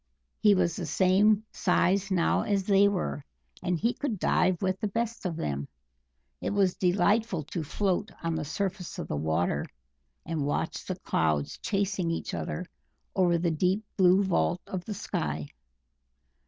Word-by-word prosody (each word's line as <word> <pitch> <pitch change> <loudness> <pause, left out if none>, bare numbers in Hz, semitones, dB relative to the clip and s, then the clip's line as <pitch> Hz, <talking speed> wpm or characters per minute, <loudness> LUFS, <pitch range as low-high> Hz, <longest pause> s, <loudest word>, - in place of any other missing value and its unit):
He 210 -2 +5
was 175 -3 +1
the 175 -5 -4
same 200 +6 +3
size 195 +1 +2
now 180 -3 +2
as 200 -2 0
they 200 +1 +5
were, 185 -7 -2 0.4
and 180 -2 0 0.2
could 265 -8 -1
dive 180 -1 +2
with 190 -1 -1
the 215 - -1
best 230 0 -2
of 170 - -3
them; 70 - -3 0.7
it - - -1
was 195 -3 +2
delightful 200 0 +2
to 160 +3 -4
float 200 +6 -1
on 165 0 0
the 160 -1 -2
surface 185 +4 -3
of - - -4
the - - -2
water 80 0 0 0.6
and 160 -3 -2
watch 145 - -2
the - - -3
clouds 75 -3 0
chasing 195 -3 -1
each 165 - -3
other 180 - -3 0.5
over 175 -3 +3
the 170 0 +1
deep 185 +6 +1
blue 185 +1 +5
vault 180 -1 +1
of 185 -2 -5
the 210 - -4
sky. 75 - -3
185 Hz, 155 wpm, -28 LUFS, 165-200 Hz, 0.7 s, He